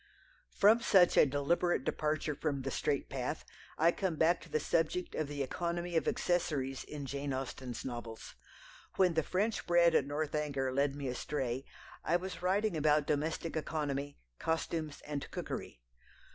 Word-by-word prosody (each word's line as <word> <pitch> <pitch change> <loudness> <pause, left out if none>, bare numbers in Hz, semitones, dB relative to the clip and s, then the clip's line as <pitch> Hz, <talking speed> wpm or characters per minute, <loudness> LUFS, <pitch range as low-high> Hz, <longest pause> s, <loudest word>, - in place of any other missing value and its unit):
From 215 +3 +6
such 190 -6 +5
a - - +7
deliberate 145 +3 +1
departure 150 +1 -1
from 140 -2 -2
the 135 - -2
straight 140 +2 0
path 135 +3 -3 0.3
I 165 +2 +5
come 185 -2 -1
back 165 +3 +3
to - - -13
the 155 - +1
subject 165 +3 0
of 155 - -1
the 145 -1 -2
economy 170 +4 -3
of 165 - +2
accessories 145 -7 0
in 145 -2 -7
Jane 140 0 -3
Austen's 130 -2 -5
novels. 120 -3 -6 0.6
When 185 -3 +4
the 160 - +2
French 200 +8 -1
bread 175 -1 +5
at 140 - +3
Northanger 145 -3 -1
led 140 +1 +1
me 140 -2 -4
astray, 130 0 -2 0.4
I 165 - +2
was 180 -1 -3
writing 195 +2 +1
about 150 -1 +3
domestic 155 +3 -1
economy, 145 -3 -2 0.2
costumes 160 -2 -2
and 145 -2 -4
cookery. - - -5
150 Hz, 155 wpm, -33 LUFS, 140-170 Hz, 0.6 s, a